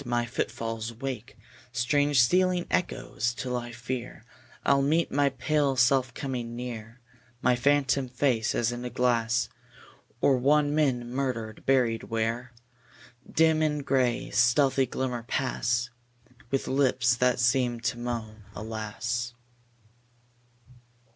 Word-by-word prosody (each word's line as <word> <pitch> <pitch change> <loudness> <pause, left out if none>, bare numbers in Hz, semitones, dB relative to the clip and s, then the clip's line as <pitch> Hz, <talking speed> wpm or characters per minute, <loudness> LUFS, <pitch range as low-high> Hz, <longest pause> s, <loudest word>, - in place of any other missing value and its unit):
My 120 0 0
footfalls 115 -1 -3
wake 125 -1 -6 0.3
Strange 145 +3 +2
stealing 180 +6 +3
echoes, 120 -8 -1
till 125 0 -3
I 120 -1 -4
fear 120 0 -6 0.4
I'll 140 0 +4
meet 155 +5 +1
my 140 0 +3
pale 140 0 0
self 130 0 +3
coming 120 -4 -4
near; 120 -1 -7 0.4
My 125 0 +4
phantom 135 0 +2
face 125 -3 0
as 120 0 +1
in 120 0 -5
a 125 - -3
glass; 120 -1 +1 0.7
Or 135 +1 +4
one 145 +3 +3
men 130 -6 +1
murdered, 120 -4 -3
buried 125 -4 +2
where? 115 +2 -2 0.8
Dim 160 -1 +3
in 150 -2 0
gray, 130 -3 +1
stealthy 130 +2 +3
glimmer, 125 -1 -3
pass 120 -1 -1 0.6
With 135 +1 -1
lips 130 -2 +2
that 125 0 +2
seem 120 -1 +2
to 125 0 -2
moan 110 -3 -5
"Alas." 110 +2 -4
125 Hz, 120 wpm, -27 LUFS, 120-135 Hz, 0.8 s, I'll